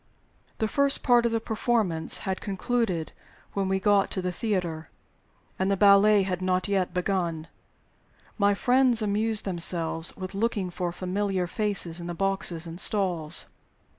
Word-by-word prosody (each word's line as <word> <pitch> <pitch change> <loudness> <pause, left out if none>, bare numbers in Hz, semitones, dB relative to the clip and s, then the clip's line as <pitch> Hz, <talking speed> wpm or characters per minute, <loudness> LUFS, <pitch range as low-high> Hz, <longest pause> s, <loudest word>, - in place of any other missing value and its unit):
The 220 - -1
first 280 +4 +2
part 240 -1 +4
of - - -3
the 225 - 0
performance 220 -7 +2
had 190 -1 -3
concluded 195 -4 -2 0.4
when 195 -1 -1
we 190 0 0
got 200 0 +2
to 190 - -3
the 180 - -1
theater, 175 -6 -3 0.7
and 190 +1 0
the 200 - +1
ballet 200 +1 +5
had 185 -1 -3
not 185 +1 0
yet 195 -3 0
begun. 175 -3 -2 0.9
My 200 -1 +2
friends 250 0 +3
amused 215 +1 0
themselves 170 -2 -1
with 185 0 -7
looking 200 -3 -2
for 175 0 -3
familiar 185 +1 -2
faces 180 -3 -2
in 170 - -7
the 175 - -5
boxes 190 -3 -1
and 170 +1 -8
stalls. 180 -7 +1
195 Hz, 150 wpm, -26 LUFS, 175-210 Hz, 0.9 s, ballet